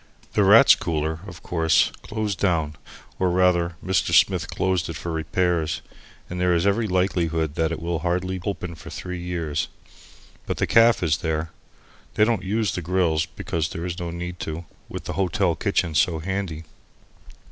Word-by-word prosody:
The -, -, +3 dB
Rats' -, -, +8 dB
Cooler, 80 Hz, -1 st, -2 dB
of 85 Hz, -5 st, -11 dB
course, 80 Hz, -3 st, +2 dB
closed 105 Hz, -3 st, -3 dB
down, 80 Hz, -6 st, +1 dB, 0.4 s
or 95 Hz, -, +2 dB
rather 90 Hz, -1 st, +2 dB
Mr. 95 Hz, -2 st, +1 dB
Smith -, -, +4 dB
closed 95 Hz, -3 st, 0 dB
it 85 Hz, -, -4 dB
for 85 Hz, +2 st, -5 dB
repairs, 80 Hz, 0 st, 0 dB, 0.4 s
and 90 Hz, 0 st, -5 dB
there 90 Hz, -1 st, +3 dB
is 85 Hz, +2 st, +1 dB
every 105 Hz, +3 st, +2 dB
likelihood 85 Hz, -5 st, 0 dB
that 80 Hz, 0 st, 0 dB
it 85 Hz, -, -3 dB
will 85 Hz, 0 st, -2 dB
hardly 90 Hz, +2 st, -1 dB
open 90 Hz, -4 st, -4 dB
for 80 Hz, 0 st, -11 dB
three 90 Hz, -1 st, -6 dB
years. 85 Hz, -4 st, -2 dB, 0.8 s
But -, -, -2 dB
the -, -, +1 dB
caff 115 Hz, -3 st, +5 dB
is 80 Hz, -3 st, +2 dB
there. 80 Hz, -2 st, -2 dB, 0.6 s
They -, -, +4 dB
don't 115 Hz, -4 st, +1 dB
use 105 Hz, 0 st, 0 dB
the 90 Hz, -, -3 dB
grills, 85 Hz, -2 st, +1 dB
because 80 Hz, -2 st, -3 dB
there's 85 Hz, +1 st, -4 dB
no 85 Hz, -1 st, -3 dB
need 90 Hz, +1 st, -6 dB
to, 80 Hz, +2 st, -5 dB, 0.2 s
with -, -, -6 dB
the -, -, -4 dB
hotel 95 Hz, 0 st, +1 dB
kitchen 80 Hz, 0 st, 0 dB
so 80 Hz, +2 st, +2 dB
handy. 90 Hz, -1 st, -3 dB
85 Hz, 170 wpm, -24 LUFS, 80-95 Hz, 0.8 s, Rats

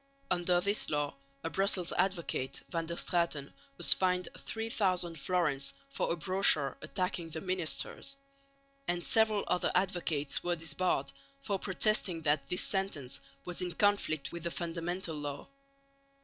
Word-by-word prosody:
Under 175 Hz, 0 st, +4 dB
this 200 Hz, +3 st, +1 dB
law 145 Hz, -1 st, 0 dB, 0.3 s
a 165 Hz, -, -3 dB
Brussels 195 Hz, -2 st, +1 dB
advocate, 175 Hz, -8 st, -1 dB
Van 165 Hz, -2 st, -2 dB
der 170 Hz, -, -3 dB
Straeten, 170 Hz, -6 st, 0 dB, 0.2 s
was -, -, +7 dB
fined 180 Hz, -1 st, 0 dB
3000 190 Hz, -6 st, -1 dB
fl. 175 Hz, +3 st, +1 dB, 0.4 s
for 275 Hz, -, -1 dB
a -, -, +2 dB
brochure 175 Hz, -5 st, +4 dB
attacking 175 Hz, 0 st, -2 dB
the 160 Hz, 0 st, -4 dB
ministers; 185 Hz, -, -2 dB, 0.7 s
and 175 Hz, 0 st, 0 dB
several 220 Hz, -2 st, +4 dB
other 180 Hz, -, +1 dB
advocates 175 Hz, -6 st, +1 dB
were 175 Hz, 0 st, +1 dB
disbarred 165 Hz, +2 st, -1 dB, 0.3 s
for 205 Hz, -8 st, -2 dB
protesting 190 Hz, -3 st, +1 dB
that 145 Hz, -2 st, +1 dB
this 180 Hz, -, +2 dB
sentence 190 Hz, -10 st, -1 dB, 0.3 s
was 180 Hz, 0 st, -3 dB
in 180 Hz, -1 st, -2 dB
conflict 200 Hz, -6 st, +2 dB
with 170 Hz, -, -6 dB
the 170 Hz, -, -2 dB
Fundamental 170 Hz, 0 st, -3 dB
Law. 145 Hz, -1 st, -5 dB
175 Hz, 135 wpm, -32 LUFS, 160-190 Hz, 0.7 s, was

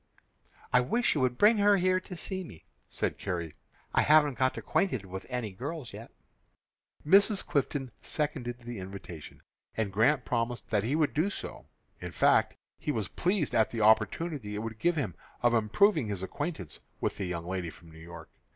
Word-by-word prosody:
"I 125 Hz, -, +6 dB
wish 235 Hz, -, +1 dB
you 145 Hz, -, 0 dB
would 125 Hz, -1 st, +1 dB
bring 210 Hz, +1 st, +5 dB
her 205 Hz, 0 st, +5 dB
here 185 Hz, 0 st, +2 dB
to 185 Hz, -1 st, -9 dB
see 190 Hz, +2 st, -4 dB
me," 85 Hz, -, -13 dB, 0.2 s
said -, -, -2 dB
Carrie. 85 Hz, -5 st, -3 dB, 0.4 s
"I -, -, +4 dB
haven't 150 Hz, -4 st, +4 dB
got 130 Hz, 0 st, +2 dB
acquainted 130 Hz, -, 0 dB
with 95 Hz, +1 st, -7 dB
any 125 Hz, -4 st, -3 dB
girls 135 Hz, -, -6 dB
yet." -, -, -9 dB, 1.0 s
Mrs. 200 Hz, +5 st, +5 dB
Clifton 135 Hz, -2 st, -1 dB
seconded 130 Hz, -5 st, -3 dB
the 120 Hz, -2 st, -7 dB
invitation, 95 Hz, -4 st, -9 dB, 0.3 s
and 105 Hz, -3 st, -1 dB
Grant 125 Hz, +6 st, +3 dB
promised 120 Hz, 0 st, -2 dB
that 105 Hz, -2 st, +2 dB
he 130 Hz, +6 st, 0 dB
would 155 Hz, -2 st, +1 dB
do 160 Hz, +6 st, +1 dB
so. -, -, -7 dB, 0.3 s
In -, -, -6 dB
fact, -, -, +3 dB, 0.2 s
he -, -, -2 dB
was -, -, -2 dB
pleased 180 Hz, -3 st, 0 dB
at 110 Hz, -1 st, +3 dB
the 115 Hz, -, -3 dB
opportunity 110 Hz, +2 st, +2 dB
it 105 Hz, -, -3 dB
would 110 Hz, -1 st, -6 dB
give 175 Hz, 0 st, +2 dB
him 145 Hz, -5 st, -2 dB, 0.3 s
of 120 Hz, 0 st, +4 dB
improving 115 Hz, -, +3 dB
his 100 Hz, -3 st, -3 dB
acquaintance 145 Hz, -, -5 dB, 0.2 s
with -, -, -2 dB
the 95 Hz, -, -2 dB
young 85 Hz, -1 st, -4 dB
lady 90 Hz, -1 st, -3 dB
from 85 Hz, 0 st, -15 dB
New 80 Hz, -, -13 dB
York. 85 Hz, -1 st, -11 dB
125 Hz, 180 wpm, -30 LUFS, 100-155 Hz, 1.0 s, I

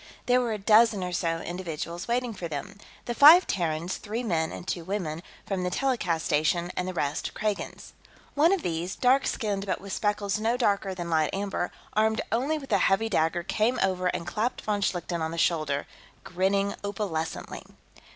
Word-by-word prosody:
There 250 Hz, 0 st, +4 dB
were 240 Hz, -2 st, -1 dB
a 215 Hz, -, -1 dB
dozen 215 Hz, 0 st, +4 dB
or 180 Hz, -, -3 dB
so 165 Hz, -1 st, -1 dB
individuals 170 Hz, -1 st, -5 dB
waiting 240 Hz, 0 st, 0 dB
for 180 Hz, -4 st, -5 dB
them 165 Hz, +6 st, -6 dB, 0.3 s
the 240 Hz, -, -2 dB
five 310 Hz, +8 st, +9 dB
Terrans, 170 Hz, -1 st, -1 dB
three 225 Hz, +3 st, -4 dB
men 165 Hz, -7 st, 0 dB
and 175 Hz, -, -8 dB
two 175 Hz, -, -2 dB
women, 170 Hz, -4 st, -3 dB, 0.2 s
from 195 Hz, -2 st, -2 dB
the 180 Hz, -, 0 dB
telecast 180 Hz, -8 st, 0 dB
station, 170 Hz, +4 st, +1 dB
and 180 Hz, -, -2 dB
the 185 Hz, -, -3 dB
rest 145 Hz, -3 st, -2 dB
Kragans. 215 Hz, -1 st, -3 dB, 0.4 s
One 310 Hz, +4 st, +4 dB
of 390 Hz, -3 st, +1 dB
these, 170 Hz, +2 st, -2 dB
dark 260 Hz, +2 st, +3 dB
skinned 205 Hz, -4 st, -2 dB
but 190 Hz, -, -1 dB
with 195 Hz, -1 st, -7 dB
speckles 205 Hz, 0 st, 0 dB
no 230 Hz, +3 st, +1 dB
darker 200 Hz, -5 st, +1 dB
than 175 Hz, -2 st, -5 dB
light 155 Hz, -2 st, +2 dB
amber, 195 Hz, -2 st, -2 dB, 0.2 s
armed 220 Hz, +1 st, +2 dB
only 270 Hz, +7 st, +1 dB
with 275 Hz, -4 st, -9 dB
a 200 Hz, -, +4 dB
heavy 210 Hz, +5 st, +2 dB
dagger, 170 Hz, -2 st, +1 dB
came 220 Hz, +7 st, +1 dB
over 185 Hz, -1 st, 0 dB
and 170 Hz, -, -2 dB
clapped 215 Hz, +7 st, -2 dB
von 210 Hz, -1 st, -1 dB
Schlichten 175 Hz, -2 st, -1 dB
on 160 Hz, -, -1 dB
the 165 Hz, -, -6 dB
shoulder, 155 Hz, -4 st, +1 dB, 0.4 s
grinning 195 Hz, +2 st, 0 dB
opalescently. 195 Hz, -6 st, -3 dB
195 Hz, 185 wpm, -27 LUFS, 170-220 Hz, 0.4 s, five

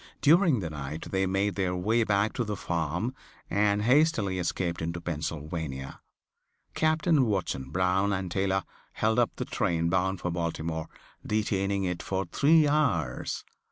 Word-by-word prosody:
During 160 Hz, -, +4 dB
the 85 Hz, -3 st, -4 dB
night 75 Hz, +1 st, -6 dB
they 95 Hz, 0 st, +1 dB
made 95 Hz, +2 st, +1 dB
their 95 Hz, -2 st, -1 dB
way 110 Hz, +6 st, +2 dB
back 105 Hz, 0 st, +1 dB
to 120 Hz, -, -1 dB
the 105 Hz, -2 st, -3 dB
farm 85 Hz, -, -2 dB, 0.4 s
and 105 Hz, 0 st, +2 dB
hastily 115 Hz, -, +3 dB
escaped 85 Hz, 0 st, -2 dB
into 85 Hz, +1 st, -3 dB
Pennsylvania. 75 Hz, -4 st, -4 dB, 0.7 s
Captain 155 Hz, -3 st, +2 dB
Watson 85 Hz, -10 st, -2 dB
Brown 95 Hz, +5 st, +1 dB
and 95 Hz, -2 st, -2 dB
Taylor 95 Hz, 0 st, +1 dB, 0.3 s
held 110 Hz, +2 st, +1 dB
up 120 Hz, -, +3 dB
the -, -, -3 dB
train 85 Hz, 0 st, 0 dB
bound 95 Hz, +1 st, +1 dB
for 90 Hz, -, -2 dB
Baltimore, 80 Hz, -2 st, -3 dB, 0.4 s
detaining 100 Hz, -2 st, 0 dB
it 90 Hz, -2 st, -2 dB
for 95 Hz, 0 st, -2 dB
three 150 Hz, -, +4 dB
hours. 150 Hz, -1 st, 0 dB
95 Hz, 145 wpm, -28 LUFS, 85-110 Hz, 0.7 s, During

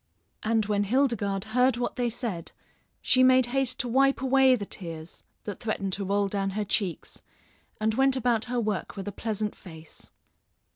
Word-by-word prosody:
And 220 Hz, -1 st, +1 dB
when 205 Hz, -1 st, 0 dB
Hildegarde 220 Hz, -4 st, 0 dB
heard 250 Hz, +1 st, +3 dB
what 245 Hz, -, -2 dB
they 245 Hz, -1 st, 0 dB
said 220 Hz, -8 st, -4 dB, 0.5 s
she 255 Hz, -, +3 dB
made 255 Hz, 0 st, +6 dB
haste 270 Hz, -2 st, +1 dB
to 245 Hz, -, -5 dB
wipe 270 Hz, +3 st, +3 dB
away 265 Hz, 0 st, +4 dB
the 210 Hz, -4 st, -5 dB
tears 165 Hz, -4 st, -8 dB, 0.2 s
that 205 Hz, -3 st, -6 dB
threatened 195 Hz, -3 st, -2 dB
to 200 Hz, -, -2 dB
roll 200 Hz, +1 st, +1 dB
down 195 Hz, 0 st, -1 dB
her 210 Hz, -, 0 dB
cheeks, 190 Hz, -3 st, -3 dB, 0.6 s
and 215 Hz, 0 st, +1 dB
went 270 Hz, +2 st, +3 dB
about 235 Hz, -3 st, +1 dB
her 245 Hz, 0 st, -1 dB
work 215 Hz, -3 st, -3 dB
with 195 Hz, -, -5 dB
a -, -, -2 dB
pleasant 215 Hz, 0 st, -3 dB
face. 160 Hz, -4 st, -12 dB
220 Hz, 175 wpm, -27 LUFS, 200-250 Hz, 0.6 s, made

